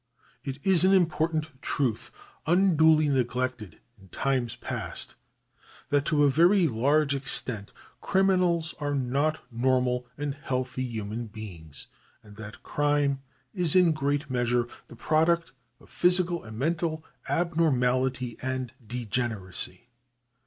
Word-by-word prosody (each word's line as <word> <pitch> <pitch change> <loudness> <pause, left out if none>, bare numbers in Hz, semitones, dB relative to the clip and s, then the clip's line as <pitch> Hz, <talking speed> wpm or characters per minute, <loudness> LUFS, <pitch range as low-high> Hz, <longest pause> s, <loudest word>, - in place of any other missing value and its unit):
It 135 -1 -5
is 185 -3 +4
an 190 +1 +5
important 160 -5 0
truth, 130 -6 -1 0.4
unduly 160 -3 +4
neglected 125 - -2 0.2
in 95 - -17
times 130 +1 -1
past, - - -3 0.8
that 145 0 +2
to 150 -2 +2
a 145 - +5
very 175 +5 +4
large 140 +4 +2
extent 125 -6 -1 0.3
criminals 180 -4 +2
are 145 -1 -1
not 140 +4 0
normal 125 0 +1
and 145 -1 -2
healthy 130 -2 -3
human 115 -2 -4
beings, 90 -9 -9 0.4
and 105 -1 -15
that 110 -1 -10
crime 145 -2 +1 0.3
is 180 -5 +1
in 180 -2 +6
great 145 -1 -1
measure 120 -1 0 0.2
the - - -12
product 160 +6 +1 0.3
of - - -19
physical 180 -1 +1
and 110 -1 -9
mental 160 +3 -1 0.2
abnormality 130 -7 +1
and 130 -1 -3
degeneracy. 120 -1 -3
140 Hz, 115 wpm, -27 LUFS, 125-160 Hz, 0.8 s, in